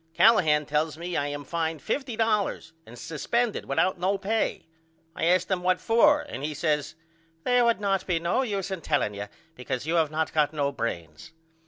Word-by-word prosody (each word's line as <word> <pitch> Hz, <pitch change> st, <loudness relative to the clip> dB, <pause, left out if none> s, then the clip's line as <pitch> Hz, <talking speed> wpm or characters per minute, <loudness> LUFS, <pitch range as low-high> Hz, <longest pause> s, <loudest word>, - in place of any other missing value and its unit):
Callahan 160 Hz, -10 st, +5 dB
tells 150 Hz, +1 st, -1 dB
me 175 Hz, +1 st, -5 dB
I 145 Hz, -, 0 dB
am 145 Hz, 0 st, -5 dB
fined 165 Hz, 0 st, -2 dB
$50.00 225 Hz, -, -1 dB, 0.2 s
and 120 Hz, +2 st, -12 dB
suspended 225 Hz, -, -2 dB
without 180 Hz, +6 st, +1 dB
no 190 Hz, +3 st, +1 dB
pay. 215 Hz, +3 st, -1 dB, 0.5 s
I -, -, -1 dB
asked 180 Hz, +2 st, +2 dB
him 185 Hz, -2 st, +1 dB
What 185 Hz, 0 st, +2 dB
for 295 Hz, +6 st, +4 dB
and 135 Hz, -, -7 dB
he 150 Hz, 0 st, -3 dB
says 150 Hz, -1 st, -1 dB, 0.5 s
They 245 Hz, 0 st, +3 dB
would 235 Hz, -2 st, +3 dB
not 195 Hz, -2 st, 0 dB
be 180 Hz, -3 st, +1 dB
no 170 Hz, +10 st, 0 dB
use 200 Hz, -6 st, -3 dB
in 190 Hz, -3 st, -4 dB
telling 145 Hz, -10 st, 0 dB
you 100 Hz, 0 st, -6 dB, 0.3 s
because 125 Hz, -1 st, -4 dB
you 160 Hz, -, -1 dB
have 160 Hz, -2 st, +2 dB
not 155 Hz, +1 st, -2 dB
got 150 Hz, -1 st, +2 dB
no 140 Hz, -2 st, 0 dB
brains. 85 Hz, -, -5 dB
165 Hz, 185 wpm, -26 LUFS, 150-200 Hz, 0.5 s, Callahan